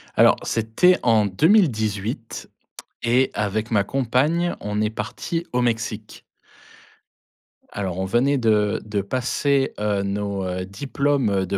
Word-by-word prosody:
Alors, - - +5
c'était 115 +12 +2
en 110 -3 +4
2018 110 - 0 0.5
et 125 +3 +2
avec 105 +2 -2
ma 100 -2 +3
compagne, 135 +9 0
on 105 0 -2
est 105 - +1
partis 165 +9 -4
au 125 - +1
Mexique. 115 -2 -3 1.5
Alors, 95 -3 -3
on 95 - -1
venait 125 +8 +2
de 105 -4 +1
de 105 -2 -2
passer, 135 +5 0
heu, 105 -2 0
nos 100 0 -3
heu, 90 0 -3
diplômes, 140 +4 -1
heu, 95 -1 0
de 100 +2 -2
110 Hz, 130 wpm, -22 LUFS, 100-130 Hz, 1.5 s, Alors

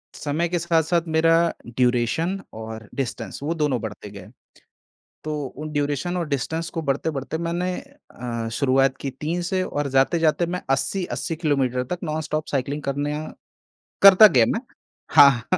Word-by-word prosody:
समय 155 +4 -1
के 175 0 0
साथ-साथ 170 0 +2
मेरा 165 +1 +4
ड्यूरेशन 125 +10 0
और 110 -1 -8
डिस्टेंस 120 -6 -4
वो 160 +3 -1
दोनों 150 -6 0
बढ़ते 105 -1 -7
गए। 100 -2 -10 1.0
तो 155 - -3 0.2
वो 155 - -6
ड्यूरेशन 145 +4 -1
और 170 - -2
डिस्टेंस 160 +4 -2
को 165 - -4
बढ़ते-बढ़ते 140 +1 -2
मैंने 170 +2 -2 0.4
अ, 115 -2 -4
शुरुआत 135 0 +2
की 140 - -2
3 165 +4 -1
से 185 +1 0
और 145 -5 -2
जाते-जाते 155 +5 +2
मैं 180 +2 -4
80-80 165 +4 -1
किलोमीटर 135 -6 0
तक 180 - -5
नॉन 155 -1 -2
स्टॉप 155 0 -3
साइक्लिंग 140 +2 -2
करना 145 +2 -2 0.8
करता 200 +2 +10
गया 125 - +4
मैं। 225 - -2 0.5
हाँ, 135 -5 +7
150 Hz, 145 wpm, -23 LUFS, 130-170 Hz, 1.0 s, करता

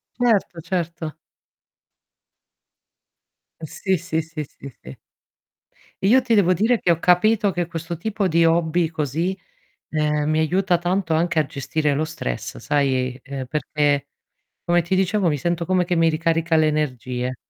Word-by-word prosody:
Certo, 215 -8 +1
certo. 165 -3 -4 2.4
Uhm, 160 - -5
sì, 190 +4 -1
sì, 160 -1 -2
sì, 160 -1 -6
sì, 140 0 -11
sì. 65 - -10 1.1
Io 250 +7 +5
ti 235 -2 +1
devo 185 -3 +4
dire 225 +6 +2
che 175 - +2
ho 170 - +1
capito 205 +4 +3
che 175 -2 -1
questo 165 0 -6
tipo 200 +2 -1
di 170 0 +3
hobby 165 0 +2
così, 160 +4 -2 0.5
ehm, 150 -1 0
mi 155 0 +1
aiuta 180 +2 +1
tanto 175 -1 0
anche 165 +1 0
a 155 - +3
gestire 145 +2 -1
lo 150 - 0
stress, 155 - -5
sai, 130 -3 0
ehm, 135 -1 -6
perché, 145 +1 0 0.6
come 175 0 +3
ti 170 +3 -1
dicevo, 190 +1 +1
mi 150 -3 +2
sento 170 +4 -2
come 185 0 +2
che 175 0 -1
mi 165 0 +4
ricarica 165 +1 0
le 155 -1 +4
energie. 130 -4 -2
165 Hz, 150 wpm, -22 LUFS, 150-180 Hz, 2.4 s, Io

